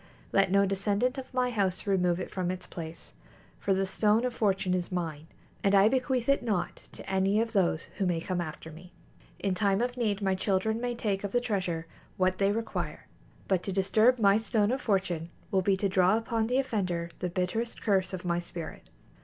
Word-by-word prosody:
Let 195 -1 +4
no 200 +1 +4
descendant 205 +7 0
of 260 - -9
my 250 -1 +1
house 195 -5 -1
remove 180 -3 +2
it 180 - -5
from 185 -2 -2
its 185 0 -4
place, 165 -1 -8 0.5
for 200 - -1
the 195 0 +2
Stone 210 +4 +2
of 250 - -1
Fortune 195 -5 +1
is 180 0 -2
mine, 160 -4 -3 0.4
and 200 0 +4
I 200 +2 +6
bequeath 255 -1 0
it 275 0 +3
not 210 -7 -1 0.2
to - - -10
any 195 +2 +2
of 225 0 -1
those 175 -5 +2 0.2
who 195 - +2
may 175 -2 +1
come 180 +1 -2
after 160 0 -7
me. 175 +3 -13 0.4
In 190 +2 -1
time 195 +1 +2
of 245 +1 -1
need 210 -4 0
my 195 -2 +1
children 200 +4 0
may 245 -1 -1
take 205 -4 -1
of 200 - -4
the 245 - +4
treasure 185 -8 -2 0.3
what 185 0 +1
they 195 0 +3
require, 225 +1 -3 0.4
but 190 -3 +2
to 195 - -4
disturb 215 +6 +3
my 200 -2 +4
Stone 220 -1 +1
of 260 - -1
Fortune 180 -6 0 0.2
will 190 - +3
be 190 +1 +2
to 200 - +1
draw 190 +2 +4
upon 225 -1 -1
the 250 +2 +1
offender 185 -10 -1
the 180 - -2
bitterest 185 +6 -2
curse 190 -3 +2
of 185 -1 -6
my 170 0 +1
spirit. 170 -2 -8
195 Hz, 205 wpm, -29 LUFS, 180-220 Hz, 0.5 s, I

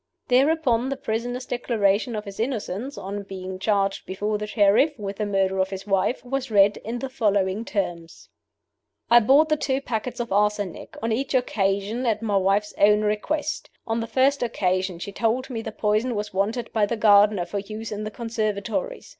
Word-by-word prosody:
Thereupon 260 -2 +3
the 275 - -3
prisoner's 245 +2 -3
Declaration 225 -2 0
of 210 0 -4
his 200 0 -9
innocence 235 +1 -3
on 200 +2 -5
being 190 -1 -7
char 200 0 +2
ged 195 - -9
before 210 +2 -2
the 210 - -4
Sheriff 210 +8 +3
with 200 -2 -5
the 210 - -1
murder 190 -1 +1
of 190 0 +1
his 195 0 -6
wife 200 +5 0
was 270 0 -3
read, 205 -1 +4
in 230 +3 -5
the 270 - -4
following 205 -5 0
terms: 175 -7 -4 0.8
"I 240 - +9
bought 275 +7 +5
the 305 0 +1
two 270 -2 0
packets 245 -1 -4
of 235 -3 -3
arsenic, 205 -3 -1
on 230 - 0
each 265 +4 -1
occasion 215 0 0
at 220 -1 0
my 205 -3 +1
wife's 200 +2 +1
own 210 +1 +5
request. 290 +9 -2 0.2
On 225 0 -1
the 230 - -3
first 265 +5 +2
occasion 185 -6 0
she 190 +4 -6
told 235 +5 -1
me 230 -2 -3
the - - -6
poison 215 +3 0
was 210 -1 -4
wanted 215 +5 -1
by 215 -3 +2
the 235 - -2
gardener 205 -3 +5
for 200 +3 -3
use 215 +2 -7
in 210 0 -4
the 215 - -3
conservatories. 225 - -3
215 Hz, 190 wpm, -24 LUFS, 200-245 Hz, 0.8 s, I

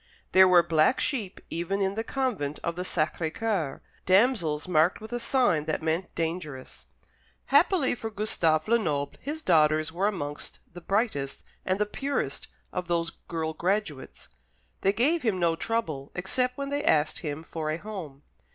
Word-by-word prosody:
There 190 0 +8
were 180 -1 +6
black 160 +9 +3
sheep 225 -10 -2
even 175 +4 -1
in 195 -1 +1
the 225 +2 -2
convent 225 - -2
of 170 -1 -2
the 180 - -3
Sacré 160 -2 -1
Coeur, 185 -10 -2 0.2
damsels 185 - +3
marked 170 0 +3
with 220 +2 -9
a 240 - -1
sign 235 - +2
that 155 0 -2
meant 165 +3 -1
"dangerous." 160 -5 -4 0.7
Happily 350 -9 +4
for 225 -2 -5
Gustave 175 -7 +1
Lenoble, 155 -12 +1
his 305 +3 -5
daughters 155 -2 +3
were 185 +5 +1
amongst 145 -8 -4 0.2
the 175 - -9
brightest 195 - -1 0.2
and 185 0 0
the 210 - +1
purest 275 +7 -3 0.3
of 180 -1 -3
those 170 -1 0 0.2
girl 160 -1 -2
graduates. 175 -4 -2 0.5
They 195 - +4
gave 290 +11 +2
him 220 -7 +1
no 170 -2 +2
trouble, 165 -10 -2
except 250 +8 -1
when 280 0 -4
they 290 +1 -1
asked 155 - +2
him 155 -1 -5
for 160 -1 -4
a 155 - -1
home. 170 -9 -8
180 Hz, 160 wpm, -27 LUFS, 155-220 Hz, 0.7 s, There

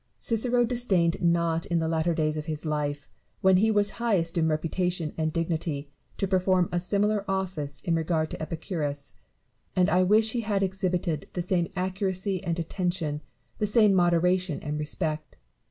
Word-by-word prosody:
Oicero 240 +1 +1
disdained 195 -10 +2
not 170 -1 +1
in 170 - +1
the 160 -1 0
latter 165 +1 +1
days 155 -1 +1
of 155 0 -5
his 155 0 -4
life, 145 -2 -2 0.3
when 190 -1 +5
he 220 +4 +3
was 205 -1 +3
highest 185 -8 +1
in 165 -2 +2
reputation 165 +1 -1
and 155 -1 -1
dignity, 155 -3 -2 0.3
to 195 - 0
perform 185 -1 +2
a 175 - +1
similar 205 +3 +1
office 185 -7 -3
in 170 - -1
regard 160 -1 0
to - - -6
Epicurus: 155 -3 -4 0.6
and 185 +1 +3
I 180 - +4
wish 215 +4 +4
he 240 - -1
had 205 -3 0
exhibited 180 -5 -1
the 175 - -2
same 175 -1 +1
accuracy 190 0 -2
and 170 -2 -1
attention, 170 -3 -2 0.4
the 210 - +1
same 210 -1 +5
moderation 180 -1 +2
and 150 0 -3
respect. 155 +1 -3
175 Hz, 165 wpm, -27 LUFS, 160-190 Hz, 0.6 s, when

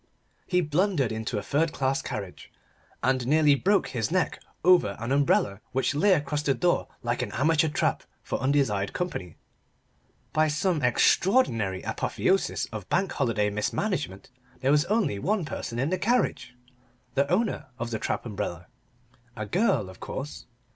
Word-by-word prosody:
He 180 -1 +2
blundered 155 - +1
into 110 0 -3
a 100 - -3
third 155 +7 0
class 135 0 0
carriage, 105 -8 -7 0.5
and 130 -1 +1
nearly 150 0 +5
broke 195 +8 +2
his 115 -4 -2
neck 185 +1 0 0.2
over 175 - +4
an 120 +3 -3
umbrella 130 -7 +2
which 130 +2 +1
lay 190 +7 +4
across 150 -2 0
the 140 -2 +1
door 175 -1 +1 0.2
like - - -1
an - - -3
amateur 160 +4 +3
trap - - 0 0.2
for - - -3
undesired 130 -8 +1
company. 95 - -4 1.0
By 155 0 +3
some 155 +2 0
extraordinary 120 - +2
apotheosis 195 +1 0
of 110 -4 -7
Bank 190 +1 +1
Holiday 110 -6 0
mismanagement, 105 - -2 0.3
there 135 +1 +2
was 150 +2 +4
only 200 - 0
one 195 - 0
person 120 -5 -5
in 135 +7 0
the 185 - 0
carriage 225 - 0 0.6
the 140 +1 +1
owner 205 -5 0
of 120 0 -4
the 110 - -2
trap - - -2
umbrella. 100 -6 -4 0.7
A 110 - -4
girl, 170 - +1
of 95 -1 -12
course. 75 +2 -6
140 Hz, 155 wpm, -27 LUFS, 110-175 Hz, 1.0 s, nearly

